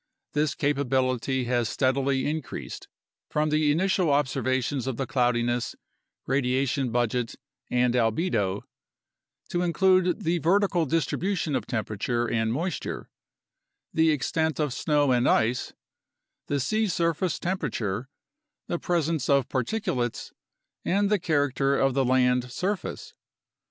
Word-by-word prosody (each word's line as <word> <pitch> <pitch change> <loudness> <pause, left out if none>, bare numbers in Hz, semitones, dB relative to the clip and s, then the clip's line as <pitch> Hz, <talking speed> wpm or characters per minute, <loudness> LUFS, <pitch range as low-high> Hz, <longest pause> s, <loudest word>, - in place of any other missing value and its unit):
This 150 -1 +1
capability 130 -2 0
has 120 -2 0
steadily 135 +1 +1
in 155 +2 -1
creased - - -8 0.4
from 150 0 0
the 150 -1 +3
initial 185 +1 +2
observations 130 -2 0
of 130 -3 -2
the 135 - -1
cloudiness, 120 -1 0 0.5
radiation 135 0 0
budget, 120 0 0 0.3
and 125 -1 +2
albedo 115 - +1 0.9
to 175 - -1
include 185 0 +2
the 170 +1 +1
vertical 175 -1 +2
distribution 165 +1 0
of - - -2
temperature 120 +1 -1
and 115 -1 0
moisture, 165 +7 -3 0.8
the 160 0 +4
extent 160 +2 0
of 150 -4 0
snow 145 -1 +2
and 125 0 +3
ice, 120 +3 +1 0.8
the 145 - 0
sea 215 - +1
surface 170 -1 0
temperature, 125 - -2 0.6
the 175 - -2
presence 165 -5 0
of 140 -2 +3
particulates, 130 - -2 0.5
and 200 +2 +1
the 210 - +3
character 145 -4 +1
of 135 -1 +2
the 135 +1 +2
land 125 -1 +2
surface. 195 +8 -3
140 Hz, 120 wpm, -26 LUFS, 125-165 Hz, 0.9 s, the